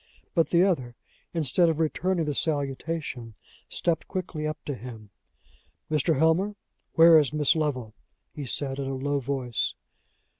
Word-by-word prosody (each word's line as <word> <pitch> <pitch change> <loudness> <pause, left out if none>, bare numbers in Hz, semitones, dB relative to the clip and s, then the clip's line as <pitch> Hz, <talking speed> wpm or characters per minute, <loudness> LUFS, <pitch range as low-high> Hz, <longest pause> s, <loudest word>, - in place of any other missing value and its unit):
But 165 -3 +2
the 175 +1 +5
other, 130 -11 0 0.4
instead 165 +2 +2
of 160 - 0
returning 165 +2 0
the 150 - -1
salutation, 140 -5 -2 0.3
stepped 170 -2 -1
quickly 175 -5 -3
up 155 +1 -3
to 145 - -2
him. 115 -4 -9 0.8
"Mr. 155 +1 +2
Helmer, 165 +7 +2 0.4
where 165 -1 +8
is 145 -4 +1
Miss 150 -1 +3
Lovel?" 130 -8 -1 0.4
he 145 - -6
said, 135 +2 -1
in 135 - -2
a 135 - -2
low 140 +2 -1
voice. 130 -3 -2
150 Hz, 145 wpm, -27 LUFS, 135-165 Hz, 0.8 s, where